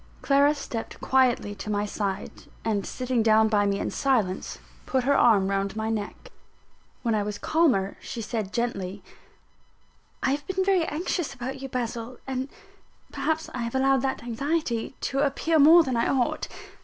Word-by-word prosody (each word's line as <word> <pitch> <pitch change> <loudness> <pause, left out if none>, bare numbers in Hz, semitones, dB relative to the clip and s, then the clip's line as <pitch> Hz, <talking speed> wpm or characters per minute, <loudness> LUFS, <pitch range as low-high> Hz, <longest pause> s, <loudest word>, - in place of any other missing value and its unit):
Clara 285 +1 +4
stepped 235 -5 -6
quietly 255 -5 +2
to 205 - -7
my 205 0 0
side; 200 -1 -3 0.3
and 210 -3 0
sitting 255 -2 -1
down 220 0 +4
by 205 -2 +2
me 200 0 +1
in - - -2
silence, 225 -9 0 0.3
put 260 -1 +1
her 280 +2 +3
arm 205 -7 +5
round 195 0 -1
my 220 0 -2
neck. 210 -2 -5 0.7
When 230 -2 +1
I 215 - +1
was 205 0 -3
calmer, 255 - +1
she 240 - -6
said 220 -3 -3
gently: 205 -5 -3 1.2
"I 265 - +2
have 285 +1 -2
been 380 0 0
very 380 -4 +3
anxious 320 -1 -2
about 260 +2 -5
you, 270 - -5
Basil; 240 0 -4
and 265 0 -3 0.6
perhaps 315 +3 -1
I 255 - -4
have 235 +1 -3
allowed 270 0 +3
that 265 -2 -2
anxiety 255 0 -2
to 275 - -1
appear 295 +3 +2
more 325 +4 +8
than 260 -4 -2
I 230 - +2
ought. 255 -3 0
245 Hz, 170 wpm, -26 LUFS, 215-275 Hz, 1.2 s, more